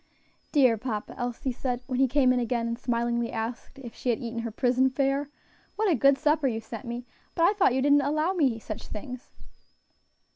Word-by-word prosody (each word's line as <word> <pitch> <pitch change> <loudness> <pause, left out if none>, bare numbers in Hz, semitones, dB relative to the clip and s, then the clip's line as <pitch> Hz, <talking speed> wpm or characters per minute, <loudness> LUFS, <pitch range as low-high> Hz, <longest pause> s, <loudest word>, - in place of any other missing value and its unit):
"Dear 255 -7 +4
papa," 215 -4 -4
Elsie 245 +1 -3
said, 250 0 -3
when 255 -1 -2
he 270 - +5
came 260 -1 +3
in 250 - +1
again 235 -1 -1
and 230 +1 -3
smilingly 235 -1 -1
asked 230 +4 -5
if 240 -4 -9
she 250 - -4
had 235 - +2
eaten 235 -1 -5
her 230 0 -3
prison 255 +3 +2
fare, 275 +2 0 0.5
"what 425 -3 +2
a - - +4
good 275 +2 +4
supper 300 0 +2
you 225 -3 -1
sent 225 +2 -8
me! 240 +1 -5 0.3
But 335 - +2
I 370 - +5
thought 375 - +3
you 265 - +1
didn't 290 0 +5
allow 305 +6 0
me 275 -10 +2
such 215 -1 -7
things!" 250 +3 -8
255 Hz, 205 wpm, -27 LUFS, 235-275 Hz, 0.5 s, he